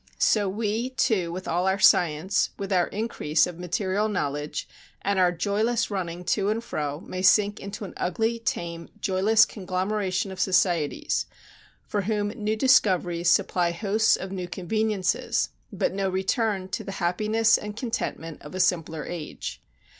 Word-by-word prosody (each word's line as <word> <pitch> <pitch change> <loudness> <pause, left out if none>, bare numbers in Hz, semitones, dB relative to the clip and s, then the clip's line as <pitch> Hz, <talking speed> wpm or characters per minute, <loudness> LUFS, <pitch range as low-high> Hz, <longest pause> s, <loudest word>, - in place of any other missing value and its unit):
So 205 -3 +3
we, 220 +4 -1
too, 215 -9 +1
with 185 +2 -6
all 180 +2 0
our 190 +1 +2
science, 175 -2 +3
with 195 0 -3
our 180 -2 +3
increase 165 -8 0
of 175 -1 -8
material 190 +4 -1
knowledge 145 -6 -3 0.4
and 200 -1 +1
our 180 -1 +4
joyless 210 +7 0
running 180 -3 -3
to 200 +2 +1
and 225 +2 -1
fro 145 -7 -3
may 185 - -5
sink 205 +2 +4
into 200 +1 -6
an - - -9
ugly, 225 +6 0
tame, 170 -7 -4
joyless 205 +4 +4
conglomeration 190 0 -2
of 190 - -8
societies, 175 -5 +1 0.6
for 205 - -1
whom 205 +1 -1
new 215 -1 -2
discoveries 180 -8 +3
supply 175 -1 +2
hosts 210 +5 +2
of 190 0 -6
new 185 -2 -4
conveniences, 195 +1 0 0.2
but - - -1
no 195 0 0
return 190 +1 0
to - - -3
the 195 - -6
happiness 215 +5 +2
and 210 0 -4
contentment 195 - -4
of 150 +5 -10
a - - -3
simpler 165 -3 0
age.... 170 -4 -6
190 Hz, 155 wpm, -26 LUFS, 175-210 Hz, 0.6 s, our